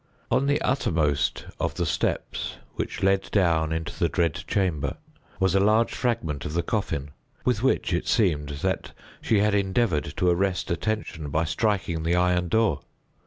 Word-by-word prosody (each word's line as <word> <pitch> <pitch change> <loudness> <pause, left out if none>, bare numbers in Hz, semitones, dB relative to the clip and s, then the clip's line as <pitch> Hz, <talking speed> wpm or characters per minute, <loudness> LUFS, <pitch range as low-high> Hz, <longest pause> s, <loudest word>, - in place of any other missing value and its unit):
On 140 - +2
the 145 +1 +2
uttermost 80 - +1
of - - -1
the - - -1
steps - - -2 0.2
which - - -4
led 95 0 +2
down 80 -5 +2
into 80 0 -3
the - - +2
dread 85 -3 +1
chamber 80 -9 0 0.4
was 95 -2 +2
a 95 - +4
large 110 +3 +3
fragment 80 - -1
of 75 - -4
the 85 - +1
coffin, 80 -10 -2 0.3
with 125 -4 +1
which, 130 -7 +1
it 85 - -1
seemed, 80 -10 +2
that - - -1 0.3
she 105 -3 +2
had 105 0 +2
endeavored 100 -4 +1
to 90 - +2
arrest 90 0 0
attention 85 -4 -2
by 80 +3 +1
striking 90 -1 0
the 85 +2 +1
iron 90 0 +2
door. 110 -5 +2
90 Hz, 165 wpm, -26 LUFS, 80-105 Hz, 0.4 s, a